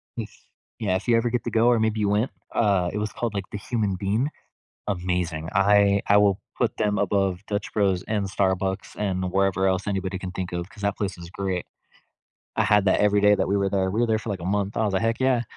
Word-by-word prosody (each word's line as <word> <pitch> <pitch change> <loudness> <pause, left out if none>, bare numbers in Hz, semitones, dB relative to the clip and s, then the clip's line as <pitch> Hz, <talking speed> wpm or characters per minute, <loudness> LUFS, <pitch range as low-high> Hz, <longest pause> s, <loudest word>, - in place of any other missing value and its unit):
if 110 -3 -5 0.5
yeah, 100 -4 0
if 95 +5 -3
you 120 - +4
ever 115 +1 +2
get 120 0 -1
to - - -3
go 115 +1 +3
or 120 -2 +4
maybe 110 0 0
you 105 - +1
went, 105 +6 +1 0.2
uh, 100 -5 +2
it - - -4
was 105 0 -2
called, 115 -3 -3
like, 100 -2 -3
The - - -4
Human 105 -2 -1
Bean. 105 +8 0 0.6
Amazing. 90 -4 -2
I 100 0 +4
I 100 - +6
will 100 -2 +3 0.2
put - - 0
them 105 -2 0
above 95 -2 +1
Dutch 100 0 -3
Bros 95 -4 +1
and 105 -2 -1
Starbucks 95 0 -1
and 95 -3 -2
wherever 95 0 +2
else 95 +1 0
anybody 95 -1 -2
can 95 -1 -5
think 90 -1 -5
of, 85 0 -3
'cause 105 0 -14
that 100 0 0
place 100 -3 -3
is 85 0 -10
great. 95 -2 -3 0.9
I - - +3
had 105 -1 +4
that 95 - +3
every 105 0 +3
day 105 0 +6
that - - 0
we 100 - +2
were 100 -1 +1
there, 95 -1 +1
we 110 +4 -1
were 120 - +3
there 110 -1 +1
for, 110 0 -6
like, 95 -3 -3
a - - -7
month, 100 0 -2
I 110 - +1
was 105 - 0
like, 95 - +1
"Heck 115 +1 0
yeah." 130 -2 +3
100 Hz, 245 wpm, -25 LUFS, 95-105 Hz, 0.9 s, I